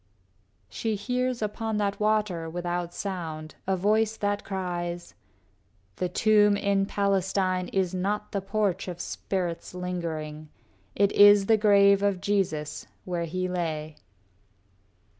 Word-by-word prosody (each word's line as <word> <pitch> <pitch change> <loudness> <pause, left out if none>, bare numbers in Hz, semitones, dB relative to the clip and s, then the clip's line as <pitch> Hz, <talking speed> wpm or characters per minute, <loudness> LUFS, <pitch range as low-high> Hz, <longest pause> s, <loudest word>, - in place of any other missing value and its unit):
VIII 95 +1 -40
She 220 -2 -2
hears, 250 +3 -1
upon 220 +1 -2
that 200 -1 -1
water 210 -6 0
without 175 0 -3
sound, 165 -6 -5
A 190 -1 +1
voice 215 +3 +2
that 205 0 -1
cries, 175 -2 -4 0.8
"The 180 - -1
tomb 210 +1 +4
in 200 -1 +1
Palestine 190 -2 0
Is 190 -2 -1
not 200 +3 -2
the 200 - -2
porch 195 -1 -1
of 175 -1 -6
spirits 175 -2 -4
lingering. 160 -4 -4 0.5
It 200 0 +3
is 205 -1 +7
the 225 - +5
grave 200 -2 +5
of 200 -2 +1
Jesus, 175 -7 -1 0.2
where 175 -2 -2
he 185 +3 -2
lay." 160 -4 -3
190 Hz, 125 wpm, -27 LUFS, 170-205 Hz, 0.8 s, is